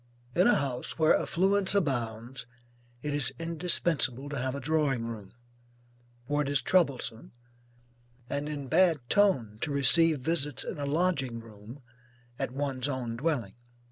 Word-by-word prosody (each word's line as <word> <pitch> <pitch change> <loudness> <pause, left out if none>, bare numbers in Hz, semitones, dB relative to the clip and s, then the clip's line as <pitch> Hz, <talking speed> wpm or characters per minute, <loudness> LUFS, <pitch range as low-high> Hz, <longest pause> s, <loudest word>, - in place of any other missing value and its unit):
In 180 - +4
a 245 - +5
house 130 -3 -3
where 160 -1 +4
affluence 195 +2 +2
abounds, 120 - -2 0.6
it 150 -1 -2
is 145 -2 0
indispensable 165 -5 0
to 145 - -4
have 130 +1 -2
a - - -4
drawing 140 -4 0
room, 110 -4 -8 0.9
for 145 +3 0
it 140 - -2
is 140 -1 +3
troublesome 135 -10 0 0.9
and 145 +3 -3
in 145 -2 -5
bad 170 +3 +4
ton 130 - +2
to 155 - -1
receive 150 +3 +5
visits 145 -3 -1
in - - -6
a 140 - -3
lodging 140 -6 0
room, 115 +4 -13 0.6
at 135 -3 -1
one's 135 0 -2
own 125 -4 -3
dwelling. 125 -7 -2
140 Hz, 140 wpm, -29 LUFS, 125-160 Hz, 0.9 s, a